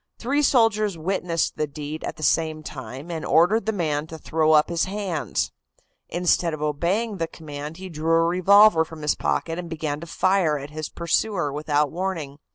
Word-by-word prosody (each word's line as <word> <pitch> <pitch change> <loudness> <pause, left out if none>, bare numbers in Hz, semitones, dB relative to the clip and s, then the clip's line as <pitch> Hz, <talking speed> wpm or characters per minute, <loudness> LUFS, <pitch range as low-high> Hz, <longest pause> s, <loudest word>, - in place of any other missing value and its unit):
Three 280 +5 0
soldiers 220 - +3
witnessed 170 -1 -1
the 155 - 0
deed 150 +2 -7
at - - -4
the 155 - -9
same 155 0 +1
time 130 +4 -8
and 160 -2 -4
ordered 190 +8 +3
the - - +3
man 155 -6 -1
to 160 - -8
throw 155 0 +1
up 150 0 +5
his 170 -1 0
hands. 190 -5 -2 0.6
Instead 175 -1 +1
of 150 - -11
obeying 185 +9 -1
the 165 -2 -1
command 150 -1 -8
he 190 0 -7
drew 165 -1 -1
a 165 0 +4
revolver 185 +1 +6
from 160 -1 -10
his 150 - +2
pocket 165 +1 -2
and 175 -1 -6
began 155 -2 -3
to 170 - -9
fire 180 -3 +2
at 140 +1 -8
his 155 -1 -5
pursuer 170 -2 -1
without 150 -1 0
warning. 165 -6 -4
165 Hz, 185 wpm, -24 LUFS, 150-185 Hz, 0.6 s, revolver